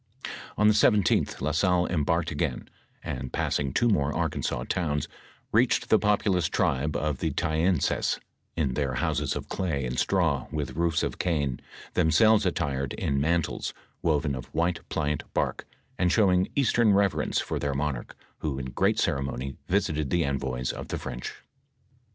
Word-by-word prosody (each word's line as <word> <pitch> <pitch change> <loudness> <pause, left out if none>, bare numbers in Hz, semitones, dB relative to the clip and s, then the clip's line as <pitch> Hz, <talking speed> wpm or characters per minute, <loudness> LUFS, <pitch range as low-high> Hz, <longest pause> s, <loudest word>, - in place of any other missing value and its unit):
On 105 - +4
the 105 - +6
17th, 105 -2 +3
La 75 +3 0
Salle 90 +3 +2
embarked 85 0 0
again, - - -2 0.4
and 65 0 -4
passing 70 -2 0
two 120 - +2
more 75 -10 +2
Arkansas - - -1
towns, 75 -5 -1 0.4
reached 115 +2 +2
the 110 - +5
populous 100 -4 +2
tribe 75 +3 0
of 75 -3 -1
the - - 0
Ta 85 -2 -1
ensas, 80 0 +1 0.4
in 70 -6 0
their 70 -2 -1
houses - - 0
of - - -5
clay 80 -8 -2
and 60 0 -2
straw, - - +1
with 75 -3 -3
roofs 85 0 +1
of - - -3
cane, 70 -7 0 0.3
themselves 100 +6 +4
attired 70 -7 -1
in 70 -1 -1
mantles, 85 +1 0 0.3
woven 75 -3 +1
of 65 -1 -5
white 85 +1 0
pliant 75 -1 -1
bark, - - -1 0.3
and 90 -1 +3
showing 95 -4 +4
Eastern 120 -6 +4
reverence 100 -1 +2
'for - - -2
their 70 -1 -1
monarch, 70 -3 -3 0.2
who 75 -4 -2
in 65 -1 -5
great - - +2
ceremony 70 -1 -1
visited 75 -7 0
the 85 +2 +2
envoys 65 -2 -2
of - - -7
the - - -3
French. 60 -2 -6
75 Hz, 155 wpm, -27 LUFS, 70-90 Hz, 0.4 s, the